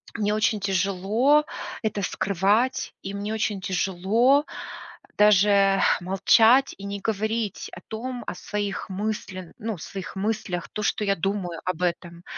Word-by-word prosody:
мне 210 -2 0
очень 215 0 +1
тяжело 200 +9 +2 0.4
это 210 -2 -1
скрывать, 200 +8 +1
и 195 - -5
мне 205 +2 -3
очень 210 -3 -1
тяжело, 200 - +2 0.6
э, - - -31
даже 200 -1 +5 0.2
молчать 225 +8 +4
и 200 - -9
не 200 0 -4
говорить 220 0 -2
о 175 - -9
том, 245 +2 -5
о - - -2
своих 205 0 -4
мыслен 190 -2 -4
ну 220 -2 -4
своих 185 +3 -7
мыслях, 195 -3 -2
то, 210 - -3
что 210 - 0
я 200 0 +2
думаю 180 -1 -2
об 180 -1 -2
этом. 170 0 -3
200 Hz, 140 wpm, -25 LUFS, 190-220 Hz, 0.6 s, даже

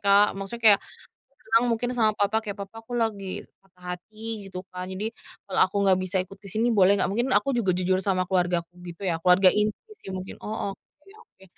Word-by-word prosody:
Kak, 200 +1 +6
maksudnya 195 +4 -6
kayak - - -3 0.6
bilang 230 0 +3
mungkin 235 +1 0
sama 220 -3 +2
papa, 205 +2 +2
kayak, 210 -2 -6
"Papa 225 +3 -12
aku 240 +2 -6
lagi 205 -5 -2 0.2
patah 180 -1 -9
hati" 215 +2 -8
gitu 185 0 -7
kan, 180 0 -5
"jadi, 205 +5 -4 0.3
kalau 195 - -1
aku 200 - -7
nggak 190 -1 +4
bisa 185 +1 -2
ikut 195 +2 -14
ke 200 - -12
sini 230 +5 +1
boleh 200 -1 +5
nggak?" 195 - +1
Mungkin 240 +5 0
aku 275 - +2
juga 200 -8 +1
jujur 185 +1 +1
sama 185 -1 +1
keluargaku 175 -2 0
gitu 175 +3 -8
ya, 170 -3 0
keluarga 180 +2 +6
inti 210 - -1
sih 190 - -9
mungkin. 185 0 -7
Oh, 215 -2 -3
oke 295 - -26
oke. 190 - -21
195 Hz, 205 wpm, -26 LUFS, 185-220 Hz, 0.6 s, Kak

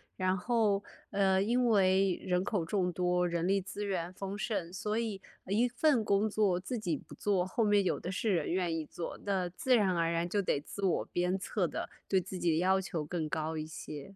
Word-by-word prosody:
然 185 0 +1
后 210 -1 +1 0.3
呃， 195 -1 +3
因 240 +4 +2
为 190 -3 +4
人 180 0 +1
口 195 -4 -1
众 180 +1 0
多， 180 0 +1
人 170 0 -1
力 195 0 +3
资 200 +2 -6
源 180 -3 -2
丰 195 +2 -5
盛， 195 -6 -2
所 210 +4 -2
以 210 -4 -3 0.3
一 220 +6 +3
份 245 -1 +2
工 205 +2 +2
作 200 -4 +2
自 215 +7 -4
己 180 -8 -1
不 - - -11
做， 195 -3 +1
后 225 +5 0
面 205 -2 +4
有 185 - 0
的 180 - -4
是 200 +2 0
人 165 -3 0
愿 175 -2 0
意 155 - -3
做。 170 - -6
那 190 -3 0
自 250 +8 +2
然 195 -6 +3
而 165 0 +1
然 170 +1 0
就 205 +1 +1
得 145 -6 0
自 200 +6 -8
我 180 - +1
鞭 180 +2 0
策 185 -1 -1
的， - - -4 0.2
对 190 -2 +3
自 185 - -7
己 170 - +2
的 160 - +2
要 190 +2 +3
求 175 -5 -3
更 160 0 -3
高 160 +1 -2
一 155 - -3
些， 155 +2 -8
190 Hz, 235 characters per minute, -32 LUFS, 175-205 Hz, 0.3 s, 为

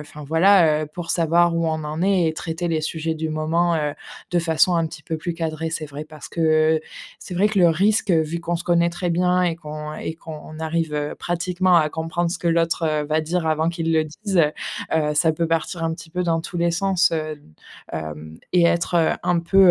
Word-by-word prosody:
enfin 150 0 -10
voilà, 160 -1 +4
heu, 155 - -4
pour 170 +2 -7
savoir 170 0 +3
où 165 0 0
on 155 -1 -1
en 155 +3 -3
est 190 -3 +3
et 160 - -3
traiter 160 0 -5
les 160 -1 0
sujets 160 +1 -2
du 160 0 -3
moment, 165 +2 +1
heu, 150 -2 -1 0.4
de 175 - +3
façon 165 +2 +3
un 165 -1 +2
petit 155 -1 -10
peu 160 - -3
plus 170 +2 -4
cadrée. 160 -1 -3
C'est 160 -1 -3
vrai 145 +1 -7
parce 155 -1 -11
que, - - -5 0.4
heu, 155 - -2 0.4
c'est 180 - -7
vrai 200 +4 +3
que 210 - -1
le 175 -2 +6
risque, 200 +5 +2
heu, 165 - +4
vu 165 +2 -4
qu'on 170 +1 -2
se 170 - -6
connaît 170 -1 +3
très 175 +1 -3
bien 180 +1 +2
et 170 -2 +1
qu'on 150 -1 -7
et 160 - -5
qu'on 155 -1 -10
arrive, 160 -1 -2
heu, 150 0 -2
pratiquement 180 +1 +1
à 155 -2 +4
comprendre 165 +2 -2
ce 180 - -3
que 170 - -1
l'autre, 165 0 +1 0.2
heu, - - -4
va 155 +1 +1
dire 165 +2 -2
avant 160 +1 +1
qu'il 165 -1 -1
le 160 -1 +3
dise, 190 +5 -3 0.5
heu, 150 -1 +1
ça 160 +2 +3
peut 165 +2 -1
partir 165 +1 -1
un 165 - 0
petit 165 -1 -12
peu 180 +1 -2
dans 165 -1 +1
tous 175 +2 -7
les 170 0 +2
sens, 190 0 +2
heu, 155 -2 -3 0.5
hem, 80 0 -6
et 180 -1 +4
être 170 -1 +2
un 175 0 +2
peu, 190 +2 +5
165 Hz, 230 wpm, -22 LUFS, 155-175 Hz, 0.5 s, le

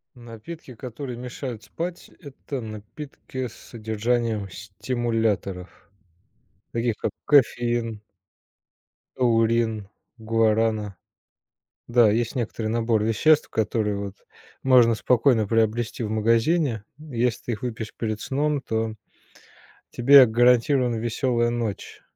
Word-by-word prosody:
Напитки, 120 +4 -10
которые 125 +2 -7
мешают 125 -2 -6
спать- 170 +9 -6
это 140 -1 -7
напитки 125 +4 -7
с - - -15
содержанием 110 -1 -2
стимуляторов, 105 -2 -3 0.8
таких, 115 -1 0
как - - -2
кофеин 120 -5 +2 1.2
аурин, 115 -3 +2 0.3
гуарана. 110 -2 +1 0.9
Да, 120 -3 +5
есть 115 +3 0
некоторый 115 -3 -3
набор 115 -1 +1
веществ, 150 +8 +3
которые 110 -1 0
вот 100 -1 -5 0.5
можно 125 -3 +6
спокойно 120 -2 +3
приобрести 115 +2 0
в 105 - -3
магазине, 115 +3 +1 0.2
если 125 -6 -2
ты 120 - -3
их 105 - -5
выпьешь 110 -3 -5
перед 110 -2 -3
сном, 145 +1 -1
то 110 -3 -2 1.0
тебе 135 +2 +7
гарантирована 120 +2 +3
веселая 120 +1 0
ночь. 115 -4 -4
115 Hz, 100 wpm, -24 LUFS, 110-125 Hz, 1.2 s, тебе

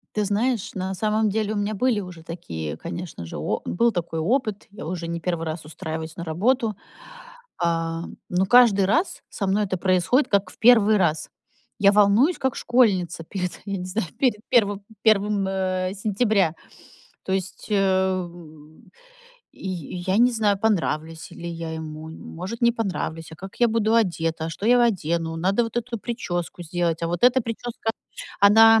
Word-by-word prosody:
Ты 210 - +1
знаешь, 215 +2 0
на 190 0 -3
самом 215 +2 +1
деле 215 +1 -1
у - - -3
меня 205 +1 -1
были 230 0 +1
уже 180 -4 -9
такие, 80 - -6
конечно 170 - -7
же, 80 - -7
о - - -2
был 235 +6 +2
такой 170 -4 -3
опыт, 215 - 0
я 205 - -9
уже 170 -1 -4
не 170 0 -3
1 170 -1 -2
раз 155 -1 -5
устраиваюсь 160 0 -6
на 170 - -6
работу. 215 +7 +1 0.9
А, 165 0 0 0.3
но 180 +2 +1
каждый 225 -4 +6
раз 320 - 0
со 200 - -3
мной 205 +2 +2
это 185 -1 -2
происходит 185 - +2
как 200 -2 +2
в - - -19
1 220 -2 +6
раз. 160 -5 0 0.5
Я 200 0 +6
волнуюсь 210 - +4
как 265 -2 0
школьница 190 -9 +2
перед, 180 +1 -5
я 200 -1 -3
не 180 - -5
знаю, 185 +1 -2
перед 240 -6 +2
первым 205 -4 +2 0.2
первым, 210 -2 +3
м, 185 -1 -1
сентября. 200 -4 +1 0.7
То 190 - -5
есть, 190 -1 -4
э, 190 -2 +2 1.2
я 180 0 -4
я - - +3
не 245 +1 +5
знаю, 210 -3 +1
понравлюсь 165 -6 -1
ли 170 - -7
я 165 -1 -5
ему, 155 0 -7
может, 185 +8 -7
не 235 - +5
понравлюсь, 180 -8 -4
а 160 - -10
как 190 +3 -10
я 240 - +5
буду 220 0 +1
одета, 165 -7 0
что 200 +5 -5
я 245 +1 +5
одену, 165 -7 0
надо 195 +7 +2
вот 230 +1 -7
эту 240 -1 -2
причёску 175 -7 -4
сделать, 170 0 -1
а - - +1
вот 175 +5 -3
эта 255 0 +5
причёска, 230 0 -4 0.6
она, 225 +2 +7
190 Hz, 170 wpm, -24 LUFS, 170-220 Hz, 1.2 s, она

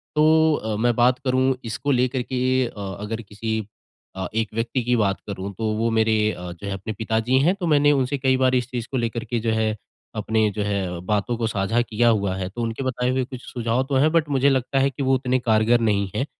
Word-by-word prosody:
तो 160 +1 +4
अ, 110 0 -3
मैं 120 +2 +2
बात 125 +1 +3
करूँ 130 0 +2
इसको 115 +5 -2
लेकर 125 0 +1
के 130 +1 0
अ, - - -9 0.3
अगर 110 +2 -4
किसी 110 +1 -4 0.6
अ, 95 -1 -3
एक 110 -1 -1
व्यक्ति 115 +3 -1
की 125 +1 +1
बात 100 -4 +1
करूँ 100 0 -5
तो 110 -1 -1
वो 115 +1 +1
मेरे 110 -1 +2
अ, 90 -2 -7
जो 90 +4 -9
है 100 - -2
अपने 100 +3 -5
पिताजी 110 +4 +1
हैं 175 +8 +3
तो 180 -4 -3
मैंने 145 -1 +4
उनसे 135 0 +1
कई 130 -1 +2
बार 130 0 +2
इस 125 -1 0
चीज़ 120 -2 -4
को 130 - -1
लेकर 115 -1 -2
के 120 +1 -2
जो 115 0 -1
है 110 -1 0 0.4
अपने 110 0 +1
जो 105 - -2
है 95 -4 -2
बातों 105 +3 0
को 115 - -1
साझा 110 +2 0
किया 120 0 +1
हुआ 100 -4 +1
है। 95 -1 -3
तो 120 +4 -6
उनके 115 +3 -3
बताए 125 -1 -1
हुए 130 0 +1
कुछ 125 0 -8
सुझाव 120 +1 -1
तो 140 - 0
हैं 150 +4 +4
बट 160 -3 +2
मुझे 140 0 +3
लगता 135 0 +1
है 135 - +3
कि 140 +1 -5
वो 130 0 +3
उतने 130 0 0
कारगर 115 0 +3
नहीं 105 -3 +1
हैं 135 - 0
120 Hz, 240 wpm, -23 LUFS, 110-130 Hz, 0.6 s, तो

